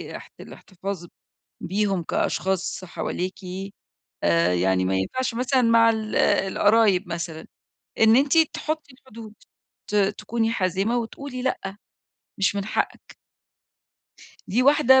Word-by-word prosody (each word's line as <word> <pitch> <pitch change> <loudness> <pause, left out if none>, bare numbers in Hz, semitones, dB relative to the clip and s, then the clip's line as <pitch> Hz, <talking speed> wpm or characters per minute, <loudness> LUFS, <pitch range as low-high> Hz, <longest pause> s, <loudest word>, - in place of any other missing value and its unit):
اح - - -10
الاحتفاظ 190 -1 -7 0.6
بيهم 195 -1 0
كأشخاص 190 +3 -1
حواليكِ، 185 +1 -4 0.9
آآ 85 +1 +3
يعني 95 +1 +2
ما 95 +1 0
ينفعش 235 - -2
مثلًا 255 +2 +1
مع 230 0 +5
ال 220 -1 -3
القرايب 200 -1 +3
مثلًا، 170 -2 -5 0.5
إن 220 +1 +6
أنتِ 280 +4 +3
تحطي 310 -2 -1
الحدود، 230 -4 -13 0.6
ت - - -4
تكوني 210 +3 0
حازمة، 195 +3 0
وتقولي 255 +2 -6
لأ، 195 -7 -2 0.7
مش 195 0 +2
من 200 - -2
حقك. 215 - -3 1.3
دي 240 +6 +2
واحدة 265 -2 +6
210 Hz, 110 wpm, -24 LUFS, 185-245 Hz, 1.3 s, إن